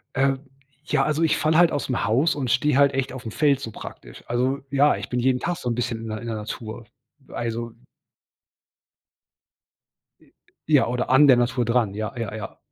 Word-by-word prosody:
Äh, 135 +1 +3 0.5
ja, - - +2
also 155 +2 0
ich 160 - +3
falle 155 0 +1
halt 175 -1 +5
ausm 135 -3 -2
Haus 130 +10 +2
und 130 -4 -3
stehe 140 +4 +2
halt 140 0 +5
echt 135 0 -1
auf 130 -1 -8
dem 110 - -7
Feld 140 -1 +2
so 115 - -6
praktisch. - - -11
Also 130 +3 0
ja, 140 +1 +4
ich - - -7
bin 125 - -2
jeden 125 0 +1
Tag 175 0 -2
so 125 - -5
'n 115 - 0
bisschen 120 -1 -2
in 115 - -6
der 110 0 -4
in 120 - -8
der 115 -1 -3
Natur. 110 +2 -7 0.4
Also 115 0 -4 2.5
I - - -25 0.3
Ja, 145 -5 +4
oder 125 +1 -2
an 135 +3 +7
der 130 -3 +7
Natur 120 +1 +1
dran, 115 -4 +1
ja, 110 +4 -4
ja, 110 -3 -4
ja. 110 - -7
125 Hz, 200 wpm, -24 LUFS, 115-140 Hz, 2.5 s, an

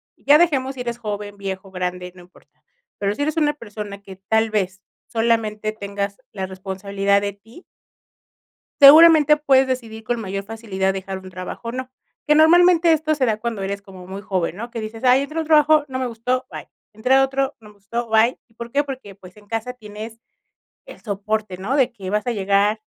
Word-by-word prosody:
ya 290 +2 +5
dejemos 275 -6 +1
si 255 - -6
eres 235 -1 -4
joven, 210 -3 -5
viejo, 195 -1 -6
grande, 180 -1 -4
no 180 - -14
importa. 180 +1 -23 0.3
Pero 200 0 -1
si 285 - -2
eres 310 +1 -1
una 295 -1 +2
persona 205 -5 -8
que 195 -1 -11
tal 220 0 +3
vez 190 -2 -2 0.3
solamente 220 -2 0
tengas 200 0 -5
la 190 -2 -4
responsabilidad 195 +1 -1
de 200 -1 -3
ti 225 - -17 1.2
seguramente 300 +1 +9
puedes 270 -3 +3
decidir 230 -4 -4
con 240 0 -2
mayor 195 -1 -4
facilidad 200 -3 -2
dejar 190 0 -5
un 185 0 -12
trabajo 185 +5 -7
o 230 - -3
no. 255 0 -5 0.4
Que 300 - +6
normalmente 340 +1 +6
esto 310 0 +1
se 260 -3 +1
da 215 -2 0
cuando 225 -3 -4
eres 200 +1 -4
como 190 -2 -13
muy 195 +2 -7
joven, 185 -4 -2
¿no? 235 +4 -7
Que 230 - -5
dices: 220 +1 -7
"Ay 255 +2 +5
entré 305 +3 -5
al 320 - -4
trabajo, 305 -1 +5
no 260 -1 -4
me 260 - -1
gustó, 250 +2 -2
bye". - - -8 0.2
"Entré 220 +5 +1
a 270 0 +6
otro, 270 +1 -2
no 210 -1 -15
me - - -20
gustó, 230 +4 -5
bye". 225 +2 +3
¿Y 225 - -30
por 235 0 -8
qué? 285 +4 +1
Porque, 260 -8 -8
pues, 185 0 -15
en 210 - -18
casa 225 +3 -3
tienes 220 -1 -10 0.7
el - - -13
soporte, 210 -1 -3
¿no? 205 +9 -2
De 265 -4 +3
que 195 -5 -8
vas 210 +3 -1
a - - +2
llegar 205 +1 +1
220 Hz, 205 wpm, -21 LUFS, 200-260 Hz, 1.2 s, seguramente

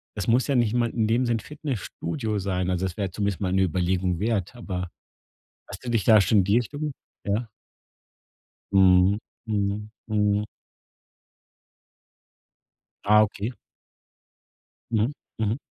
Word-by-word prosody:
es 100 - -3
muss 120 +3 +3
ja 140 - +1
nicht 120 -3 +2
mal 120 -1 +2
in 115 -2 0
dem 120 +3 +2
Sinn 120 -1 +2
'n - - -5
Fitnessstudio 115 - -4
sein. 95 -2 -1
Also, 90 +1 0
das 90 -2 -4
wär 100 -3 -2
zumindest 100 0 -2
mal 95 -2 0
'ne 95 0 +3
Überlegung 90 0 0
wert, 105 0 -1
aber 90 -7 -4 0.8
hast 95 +5 -9
du 120 - -3
dich 115 -4 +1
da 110 -1 +7
schon 105 +2 +4
in - - +4
die 100 +4 +3
Richtung 145 +5 -2 0.3
ja? 105 +4 -1 1.2
Mhm, 95 +1 +5 0.3
mhm, 105 0 -1 0.2
mhm. 105 -1 +1 2.6
Ah, 105 +1 +7
okay. 110 +3 -2 1.4
Mhm, 115 +4 +2 0.3
mhm. 110 +2 0
105 Hz, 135 wpm, -25 LUFS, 95-115 Hz, 2.6 s, da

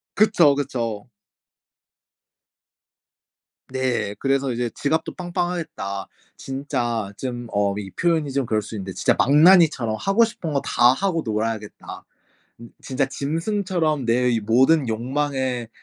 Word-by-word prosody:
그쵸 175 -9 +4
그쵸. 120 -7 -3 2.6
네. 130 -6 -1
그래서 135 -1 0
이제 120 0 -2
지갑도 160 +3 -1
빵빵하겠다. 175 - -4 0.3
진짜 120 -6 -3
좀 120 -2 -5
어 100 -1 +1
이 100 -2 -6
표현이 160 -5 0
좀 135 -1 -1
그럴 110 -1 0
수 110 - -9
있는데 95 -2 -6
'진짜 - - +2
망나니처럼 150 -6 +5
하고 195 +4 +3
싶은 220 -9 -3
거 140 - +1
다 120 +1 +4
하고 180 +1 -1
놀아야겠다.' 110 -1 -4 0.6
음 115 - -11
'진짜 135 +1 -1
짐승처럼 160 - -1
내 125 +2 +2
이 115 - +1
모든 130 +6 +3
욕망에 130 0 -2
130 Hz, 255 characters per minute, -22 LUFS, 115-160 Hz, 2.6 s, 망나니처럼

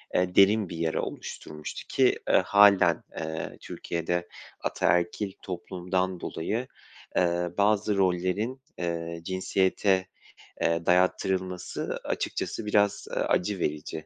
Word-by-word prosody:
eee, 90 0 +1
derin 100 0 +5
bir 85 - -6
yara 80 -1 0
oluşturmuştu 75 0 -7
ki, - - +4
ııı, - - +6
hâlen, 100 -1 +5 0.2
eee, 80 0 -4
Türkiye'de 85 +1 -3 0.3
ataerkil 90 +3 0
toplumdan 90 0 -2
dolayı, 110 +10 -3 0.5
eee, 85 0 +2
bazı 105 0 +2
rollerin, 95 +7 0 0.2
eee, 85 -1 -3
cinsiyete, 95 +1 +1 0.5
eee, 85 0 +1
dayattırılması 90 0 0
açıkçası - - -3
biraz, 105 -1 +2
ııı, - - 0
acı 95 +1 0
verici 75 0 -3
90 Hz, 105 wpm, -27 LUFS, 85-100 Hz, 0.5 s, ııı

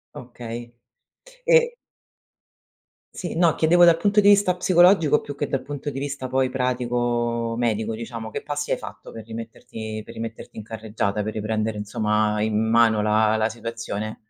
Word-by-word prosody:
Okay, 120 -1 -8 0.7
ehm 485 -1 +5 1.4
sì, 175 - -5
no. 170 -2 +4
Chiedevo 175 +2 +4
dal 170 -1 +6
punto 205 +4 +2
di 200 - +4
vista 200 -3 +4
psicologico, 175 -3 +4
più 145 - -7
che 145 0 -2
dal 135 - -2
punto 145 0 -5
di 135 - -7
vista 140 -1 -4
poi, 130 0 +1
pratico-medico 120 -3 -1
diciamo. 115 0 -6
Che - - -6
passi 145 0 -3
hai - - +2
fatto - - -10
per 110 -1 -9
rimetterti 110 -1 -7
per - - -11
rimetterti 115 0 -8
in 110 - -6
carreggiata? 105 -1 -3
Per 110 +1 -4
riprendere, 110 0 -2
insomma, 105 0 0
in 110 0 0
mano 115 -2 +4
la 110 +1 +3
la 110 0 +1
situazione? 115 -2 -5
115 Hz, 155 wpm, -23 LUFS, 110-145 Hz, 1.4 s, dal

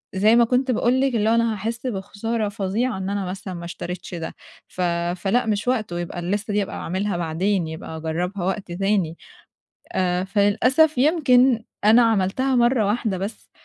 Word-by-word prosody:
زي 210 +4 +4
ما 235 0 +6
كنت 255 +2 +1
باقول 250 +2 +2
لِك 270 -2 +1
اللي 215 -1 +2
هو 230 - +4
أنا 230 -1 +2
هاحس 230 +4 -4
بخسارة 210 +1 -3
فظيعة 205 +3 -1
إن 190 0 -3
أنا 200 -1 -2
مثلًا 185 +1 -6
ما 170 -1 -7
اشتريتش 180 +1 -6
ده، 165 -1 -6 0.3
ف 185 - -7 0.3
فلأ 195 +7 0
مش 210 0 -1
وقته، 215 -9 -1
يبقى 175 0 -5
الليستة 205 +4 -2
دي 205 - +2
هابقى 195 - -5
أعملها 190 +2 -2
بعدين 175 +2 0
يبقى 160 0 -7
أجرّبها 175 +4 -3
وقت 190 -1 -3
تاني. 190 -2 0 0.8
آآ، 180 0 0
فللأسف 225 +10 +3
يمكن 255 -5 +4 0.2
أنا 225 +3 +7
عملتها 225 +4 +1
مرّة 240 -2 +3
واحدة 210 -2 -1
بس 200 +4 -6
205 Hz, 170 wpm, -23 LUFS, 185-235 Hz, 0.8 s, أنا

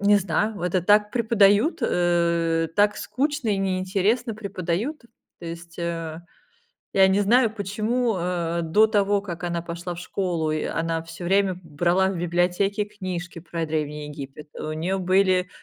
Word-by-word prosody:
Не 205 +1 +5
знаю. 200 +3 0
Вот 175 - -2
это 185 - +3
так 210 +2 +4
преподают, 225 - +3
э, 170 -2 +1
так 205 0 +3
скучно 280 -2 -2
и 200 - +1
неинтересно 195 +5 0
преподают. 200 - -3 0.4
То 170 - -8
есть, 170 0 -9
э, 165 -1 -4 0.7
я 190 -1 +6
не 195 +2 +3
знаю, 225 +2 +3
почему, 220 +3 -1
э, 170 -1 -1
до 205 +7 +4
того, 205 -2 +2
как 175 -3 -6
она 170 -1 -1
пошла 175 +1 -5
в - - -10
школу, 180 -3 -2
и 155 - -1
она 165 0 -1
всё 165 +1 -9
время 190 0 +2
брала 175 +4 +1
в 190 - -3
библиотеке 180 +4 +1
книжки 185 -4 -6
про 165 -1 -4
Древний 150 -1 -3
Египет. 145 0 -9
У 155 - -4
неё 175 +5 -1
были, 185 0 +2
185 Hz, 155 wpm, -24 LUFS, 170-205 Hz, 0.7 s, я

